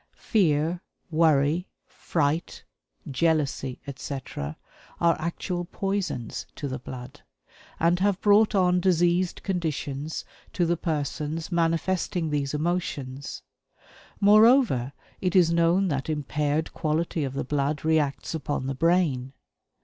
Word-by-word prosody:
Fear, 170 -4 +1 0.3
worry, 155 +1 +3 0.2
fright, 160 0 -2 0.5
jealousy, 140 -3 0
etc., 130 - -6 0.4
are 170 -1 +4
actual 175 +2 -3
poisons 195 - -3
to 145 - -4
the 130 -1 -4
blood, 125 +1 -9 0.6
and 170 +2 +3
have 200 0 +2
brought 210 +1 +4
on 180 -2 +3
diseased 175 0 +2
conditions 155 -5 -3 0.3
to 175 - +1
the 170 +1 +2
persons 155 +1 -3
manifesting 165 0 0
these 145 -1 -1
emotions. 150 -5 -3 0.8
Moreover, 210 - +5 0.3
it 180 -1 0
is 175 -3 +5
known 170 +3 +3
that 140 -1 -2
impaired 150 +1 -1
quality 160 0 -1
of 135 -2 -3
the - - -1
blood 145 +2 -1
reacts 155 -3 +1
upon 145 -4 -2
the 135 - -1
brain. 140 -4 +1
160 Hz, 110 wpm, -26 LUFS, 140-175 Hz, 0.8 s, Moreover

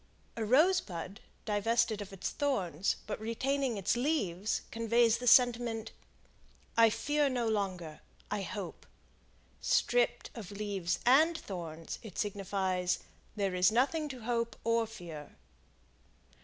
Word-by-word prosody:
A 230 - -2
rosebud 225 - +2 0.3
divested 215 +1 +1
of 200 - -8
its 195 -1 -4
thorns, 195 - 0
but - - -4
retaining 255 +2 -1
its 195 +3 +1
leaves 220 - 0
conveys 230 0 +3
the 245 - -4
sentiment. 235 -2 +4 0.8
"I 230 -1 +7
fear 295 +5 +1
no 245 -3 -1
longer; 185 -7 -2 0.3
I 210 -1 -1
hope." 195 -1 -6 0.7
Stripped - - +1
of 215 -6 -8
leaves 200 -4 -2
and 310 +7 +5
thorns, 165 - -6
it 215 -6 -10
signifies, 190 -3 -1 0.4
"There 200 -3 -1
is 180 +1 +4
nothing 285 +6 +1
to 260 -3 -8
hope 235 0 -1
or 230 0 +2
fear." 165 -9 -9
220 Hz, 120 wpm, -32 LUFS, 190-245 Hz, 0.8 s, I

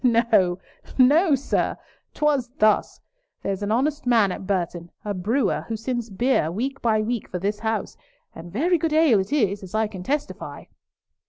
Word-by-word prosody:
No, 225 -7 +3 0.4
no, 290 +5 +5
sir! 275 - -1 0.4
'Twas 290 -5 +1
thus. 215 0 +2 0.4
There's 195 0 -2
an 205 +1 -2
honest 275 +4 0
man 225 -5 +4
at 185 - -6
Burton, 175 -3 -2 0.2
a 205 - -1
brewer, 215 +9 0
who 225 - -3
sends 240 0 -3
beer 205 -4 +1
week 265 +9 -3
by 215 -2 +2
week 235 0 -3
for 180 - -4
this 205 +3 -2
house, 220 -2 -2 0.4
and 170 +1 -10
very 330 - +1
good 320 0 -1
ale 310 -9 +5
it 190 - -3
is, 205 -9 +1
as 190 +1 -8
I 220 0 +2
can 205 -4 -7
testify. 285 +9 -4
225 Hz, 170 wpm, -24 LUFS, 195-265 Hz, 0.4 s, no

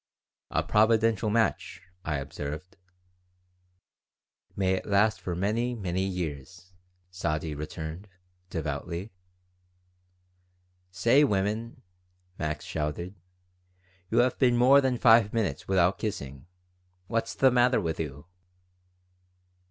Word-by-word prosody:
"'A - - 0
providential 110 0 +3
match,'" 115 +1 0 0.2
I 75 - -2
observed. 75 +5 -6 1.8
"May 95 -1 +1
it 95 - -3
last 100 -1 +2
for 90 -1 -3
many, 115 +7 -1
many 95 -4 -2
years," 90 -2 -5 0.4
Sadie 80 -4 -2
returned, 80 +5 -6 0.4
devoutly 85 +5 -4 1.8
"Say, 115 +10 +4
women!" 110 0 -1 0.6
Max 75 -1 -3
shouted, 80 +4 -3 1.0
"you - - 0
have 125 0 +3
been 125 -3 +4
more 135 +4 +6
than 130 -2 0
five 115 -3 +5
minutes 115 -4 -2
without 95 0 +2
kissing. 70 - -5 0.6
What's 115 +2 -2
the 130 -1 +4
matter 125 +1 +4
with 80 -5 -3
you?" 75 -3 -5
95 Hz, 100 wpm, -28 LUFS, 80-115 Hz, 1.8 s, more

